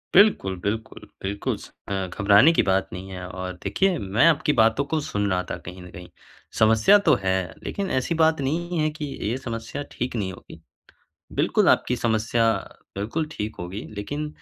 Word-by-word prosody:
बिल्कुल, 190 - +5
बिल्कुल, 110 +2 -3 0.2
बिल्कुल 100 +1 -2
स - - -12 0.2
अ, 95 -1 -2
घबराने 100 - +5
की - - +4
बात 95 0 +2
नहीं 95 +1 -7
है, 90 -1 -6
और 95 0 -5
देखिए, 190 -2 +1
मैं 100 +3 +2
आपकी 150 -2 +3
बातों 115 +5 +3
को 155 +2 -1
सुन 105 -7 -1
रहा 90 0 +1
था - - -1
कहीं 90 +1 -8
न 90 - -11
कहीं। 90 0 -11 0.5
समस्या 110 - +6
तो - - +6
है, 95 -2 0
लेकिन 200 -1 -3
ऐसी 165 +6 -2
बात 160 -2 +3
नहीं 170 +5 -1
है 155 - +2
कि 150 - -3 0.2
ये 115 +5 -1
समस्या 115 +3 -5
ठीक 125 0 -4
नहीं 95 -4 -2
होगी। - - -13 0.7
बिल्कुल, - - +2
आपकी 125 - +3
समस्या 115 0 +1 0.5
बिल्कुल 150 +10 -2
ठीक 105 +1 -5
होगी। 90 +4 -5
लेकिन 145 +9 -4
110 Hz, 180 wpm, -24 LUFS, 95-145 Hz, 0.7 s, समस्या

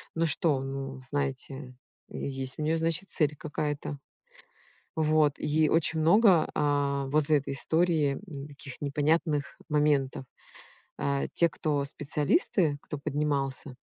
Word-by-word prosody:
Ну 165 - +2
что, 150 -3 +2
ну 135 0 -5
знаете, 135 -1 -4 0.3
есть 135 0 -4
у - - -2
неё 160 +2 +1
значит 165 +4 0
цель 150 -1 +1
какая-то. 150 -1 -3 1.0
Вот, 155 -2 +3
и 155 0 +2
очень 160 0 +1
много, 175 0 +5
а, 140 -1 +1
возле 150 +1 +3
этой 135 0 -5
истории, 160 -2 +1 0.2
м, 140 +2 -7
таких 140 -2 -11
непонятных 150 +1 0
моментов. 145 -3 +1 0.7
Э, 140 0 0
те, 170 - +3
кто 145 -2 -1
специалисты, 150 - 0
кто 150 - -6
поднимался 140 -2 -2
145 Hz, 120 wpm, -28 LUFS, 140-155 Hz, 1.0 s, много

